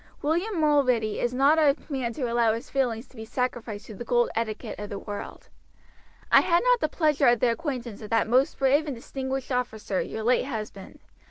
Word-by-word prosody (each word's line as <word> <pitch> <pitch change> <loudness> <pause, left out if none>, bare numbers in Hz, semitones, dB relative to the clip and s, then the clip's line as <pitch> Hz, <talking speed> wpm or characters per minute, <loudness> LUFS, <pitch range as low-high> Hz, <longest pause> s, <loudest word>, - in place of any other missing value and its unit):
William 345 +6 0
Mulready 255 -8 +2
is 240 - 0
not 275 +5 +4
a 290 -3 +4
man 265 -5 -2
to 265 - -5
allow 235 -2 +2
his 235 +5 -8
feelings 245 -4 -1
to - - -22
be 220 - -7
sacrificed 225 -3 -3
to 220 - -10
the 225 - -7
cold 240 0 +1
etiquette 220 -2 -3
of 205 0 -6
the 200 - -5
world. 205 0 -8 0.8
I - - +8
had 340 +3 +2
not - - +4
the 310 - 0
pleasure 300 -4 +2
of 240 -1 +4
the 240 +1 +3
acquaintance 245 -6 -4
of 210 - -8
that 225 -1 +2
most 260 +6 +2
brave 280 +3 +2
and 280 - -3
distinguished 265 +2 -5
officer 220 -6 -2
your 220 - -5
late 250 +3 +2
husband. 215 -6 -7
250 Hz, 200 wpm, -26 LUFS, 225-280 Hz, 0.8 s, I